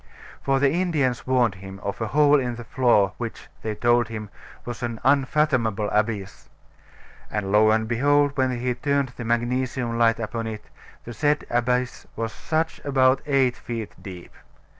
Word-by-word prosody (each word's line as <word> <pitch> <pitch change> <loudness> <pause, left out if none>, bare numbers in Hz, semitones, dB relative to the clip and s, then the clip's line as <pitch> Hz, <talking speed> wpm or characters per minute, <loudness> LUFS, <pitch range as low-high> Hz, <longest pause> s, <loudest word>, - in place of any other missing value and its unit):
For 135 0 +1
the 140 0 +3
Indians 155 -10 0
warned 125 -5 +3
him 95 0 -10
of 100 +3 -4
a 110 - 0
hole 145 +3 +4
in 125 -2 -2
the 120 - -8
floor 110 -4 +2
which 115 -2 -6
(they 110 -1 -3
told 120 +1 +2
him) 105 -2 -7 0.3
was 120 -1 -6
an 120 -2 -3
unfathomable 130 -6 +2
abyss. 105 -2 -2 0.8
And 105 -2 -3
lo 105 +1 +5
and 110 0 +2
behold, 145 +4 +2
when 130 -2 0
he 125 0 0
turned 140 +1 0
the 125 -1 -8
magnesium 120 +1 -1
light 115 -1 +3
upon 115 0 -3
it, 110 -1 -6 0.4
the 120 - -8
said 145 +6 +1
abyss 125 +1 0
was 115 0 -3 0.2
just 160 0 -1
about 130 -1 +3
eight 135 -3 +2
feet 115 -3 -6
deep. 90 -4 -10
120 Hz, 160 wpm, -24 LUFS, 110-135 Hz, 0.8 s, lo